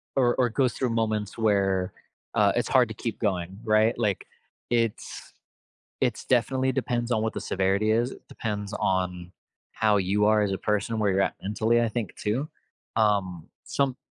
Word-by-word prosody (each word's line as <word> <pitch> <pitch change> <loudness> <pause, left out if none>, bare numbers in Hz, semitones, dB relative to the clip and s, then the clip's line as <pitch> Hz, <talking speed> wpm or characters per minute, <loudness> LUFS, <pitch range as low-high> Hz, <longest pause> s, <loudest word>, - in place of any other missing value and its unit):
or 125 -2 +3
or 125 - +3
goes 130 +2 +1
through 130 - -1
moments 110 -2 -1
where, 95 -4 +1 0.4
uh, - - +4
it's - - 0
hard - - +5
to - - -6
keep - - -5
going, 95 -1 -2
right? 110 +1 +4
Like, 105 -5 -1 0.4
it's 115 -2 -2 0.7
it's - - 0
definitely 130 +1 +2
depends 120 -2 -1
on 110 -2 +1
what 110 - -1
the - - -3
severity 95 +3 +1
is, 120 +3 +1
it - - -12
depends 105 -2 -4
on 90 -2 -1 0.4
how 105 -1 +2
you 100 +2 +2
are 110 0 +4
as 100 -1 0
a 95 - -2
person, 105 +2 -1
where 105 -2 +2
you're 95 +1 +2
at - - 0
mentally, 110 +3 +1
I 115 - +1
think, 110 -4 -4
too. 120 +8 -2 0.5
Um, 100 -6 +1 0.2
some 135 -2 0
110 Hz, 175 wpm, -26 LUFS, 100-115 Hz, 0.7 s, hard